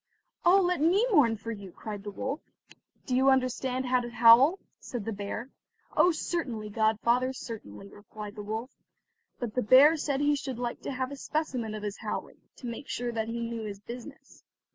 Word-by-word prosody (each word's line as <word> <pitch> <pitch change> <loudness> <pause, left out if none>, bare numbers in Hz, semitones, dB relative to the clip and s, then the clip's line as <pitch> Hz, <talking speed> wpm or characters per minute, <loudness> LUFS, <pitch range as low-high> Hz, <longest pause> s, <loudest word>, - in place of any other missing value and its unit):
"Oh, 365 +3 +6
let 355 -4 +1
me 370 +9 +4
mourn 240 - +4
for 230 +2 -6
you," 200 -4 -8
cried 205 +2 -7
the 205 - -5
wolf. 265 +8 -4 0.7
"Do 255 - -1
you 265 +1 +5
understand 260 0 +1
how 255 0 +3
to 240 -1 -5
howl?" 240 +8 +7 0.2
said 240 -5 -6
the 225 - -2
bear. 205 +5 -5 0.4
"Oh, 360 - +5
certainly, 260 -10 -3
godfather, 235 +4 +2
certainly," 210 - -8
replied 205 +1 -10
the 210 - -7
wolf; 220 +5 -4 0.7
but 235 -4 -4
the 250 - +1
bear 270 +8 +7
said 285 -2 -1
he 290 0 +3
should 270 -3 -5
like 240 -1 -4
to - - -4
have 260 0 -3
a - - -5
specimen 260 -7 -3
of 210 - -6
his 205 0 -4
howling, - - -5 0.2
to - - -11
make 240 +4 -6
sure 245 0 -2
that 225 -1 -2
he 235 +1 -3
knew 230 -1 -4
his 200 -2 -6
business. 250 +6 -11
245 Hz, 190 wpm, -29 LUFS, 220-270 Hz, 0.7 s, howl